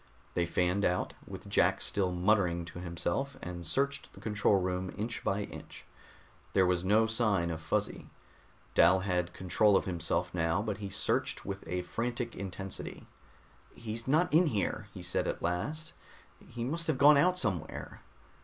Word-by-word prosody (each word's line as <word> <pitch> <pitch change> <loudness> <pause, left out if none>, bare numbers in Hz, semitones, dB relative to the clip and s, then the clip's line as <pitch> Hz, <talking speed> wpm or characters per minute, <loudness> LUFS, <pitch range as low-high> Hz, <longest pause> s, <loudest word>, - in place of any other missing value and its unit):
They 85 -1 +1
fanned 90 +3 +1
out, 90 -1 +1
with - - -8
Jack - - +3
still 95 -3 0
muttering 90 -2 +2
to 85 - -9
himself, 90 +11 -2
and 85 0 -6
searched 140 +1 -1
the - - -13
control 105 -2 +2
room 90 0 -2
inch 115 +3 -3
by 100 +1 0
inch. - - -10 0.7
There 95 - +5
was 90 -1 +1
no 105 +4 +4
sign 110 -7 +1
of 80 -1 -5
Fuzzy. - - -2 0.6
Dal 90 +2 +6
had 90 -2 0
control 100 +2 +3
of - - -1
himself 85 0 -1
now, 85 +1 +1
but 105 -2 -3
he 100 -2 -5
searched 95 - -1
with 95 0 -5
a 90 +2 -2
frantic 120 +5 -3
intensity. 95 0 -6 0.7
"He's 115 +1 -5
not 155 +4 +3
in 170 +2 +6
here," 105 -3 -1
he 90 -4 -9
said 90 - 0
at - - -3
last, 110 - -2 0.5
"he 120 -1 -5
must 165 +7 -2
have 155 -4 +1
gone 145 +2 +8
out 180 +6 +4
somewhere." 95 - -3
95 Hz, 165 wpm, -31 LUFS, 90-115 Hz, 0.7 s, gone